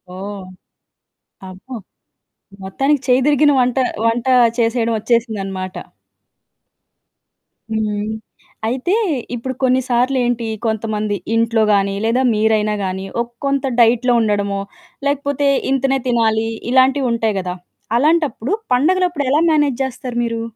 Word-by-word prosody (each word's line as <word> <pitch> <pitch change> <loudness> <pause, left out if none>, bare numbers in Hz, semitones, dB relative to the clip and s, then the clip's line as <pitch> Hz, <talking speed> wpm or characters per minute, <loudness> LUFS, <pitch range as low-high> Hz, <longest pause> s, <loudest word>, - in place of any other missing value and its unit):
ఓహ్! 195 0 -7 1.0
అబ్బో! 185 +8 -11 0.9
మొత్తానికి 270 +9 0
చెయ్యి 255 +1 +4
దిరిగిన 295 0 +4
వంట 250 +1 +1 0.3
వంటా 240 +3 +1 0.3
చేసేయడం 230 0 +1
ఒచ్చేసిందనమాట. 205 -5 -2 2.0
హ్మ్. 210 -1 -1 0.6
అయితే, 260 - -1 0.4
ఇప్పుడు 260 +2 -4
కొన్ని 260 0 +3
సార్లేంటి, 245 -1 +1 0.2
కొంతమంది 215 -1 -1 0.2
ఇంట్లో 230 -1 +2
గానీ, 195 0 +1
లేదా 235 +3 +2
మీరైనా 215 0 +1
గానీ, 190 +1 -4 0.2
ఒక 235 - -5 0.2
కొంత 275 -1 0
డైట్‌లో 240 +2 +4
ఉండడమో, 205 -2 0 0.5
లేకపోతే 285 0 0 0.2
ఇంతనే 270 0 +1
తినాలి, 225 -2 +1 0.2
ఇలాంటివుంటాయి 255 -5 +2
గదా! 180 -1 -4 0.4
అలాంటప్పుడు, 300 - +1 0.2
పండగలప్పుడు 345 +2 +1
ఎలా 300 - +3
మేనేజ్ 290 -4 +1
జేస్తారు 255 -1 -5
మీరు? 230 -1 -2
235 Hz, 100 wpm, -18 LUFS, 215-265 Hz, 2.0 s, చెయ్యి